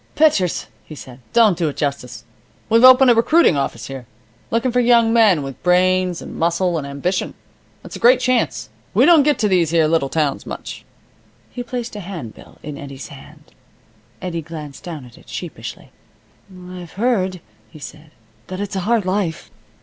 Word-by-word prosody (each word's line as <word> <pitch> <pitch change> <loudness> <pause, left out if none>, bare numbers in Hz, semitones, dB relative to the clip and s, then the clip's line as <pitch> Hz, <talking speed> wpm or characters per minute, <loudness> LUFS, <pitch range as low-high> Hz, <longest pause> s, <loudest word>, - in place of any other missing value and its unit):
"Pitchers," 245 - +2 0.2
he 155 - -11
said, 130 -3 -12
"don't 225 -5 +4
do 165 -2 -1
it 145 - -9
justice. 125 -6 -4 0.5
We've 230 +2 +4
opened 255 0 +8
a - - +6
recruiting 235 - +4
office 140 - -3
here. 135 -3 -8 0.4
Looking 230 +3 0
for 250 - +1
young 235 -2 +4
men 210 -10 +4
with 135 -1 -8
brains, 180 0 +2
and - - -9
muscle, 170 +1 0
and 140 - -6
ambition. 140 +7 -3 0.5
It's - - -10
a - - -7
great 250 +2 +5
chance. 255 - 0 0.3
We 240 +6 +5
don't 330 -2 +7
get 295 +1 +2
to 215 - +1
these 180 -5 +2
here 165 -1 +3
little 155 -3 +1
towns 150 -2 -1
much." - - -8 0.7
He 245 - -6
placed 245 -2 -5
a - - -5
handbill 170 - -9
in 150 -2 -7
Eddie's 140 -2 -9
hand. 140 -2 -15 0.7
Eddie 170 -2 -3
glanced 155 -3 -9
down 160 -7 -7
at 120 - -16
it - - -20
sheepishly. - - -8 0.6
"I've 180 -2 -11
heard," 195 -5 0 0.3
he 155 - -14
said, 155 +1 -11 0.4
"that 185 0 -6
it's 205 -1 -4
a - - 0
hard 230 -5 +2
life." 185 -4 -2
180 Hz, 175 wpm, -19 LUFS, 155-230 Hz, 0.7 s, opened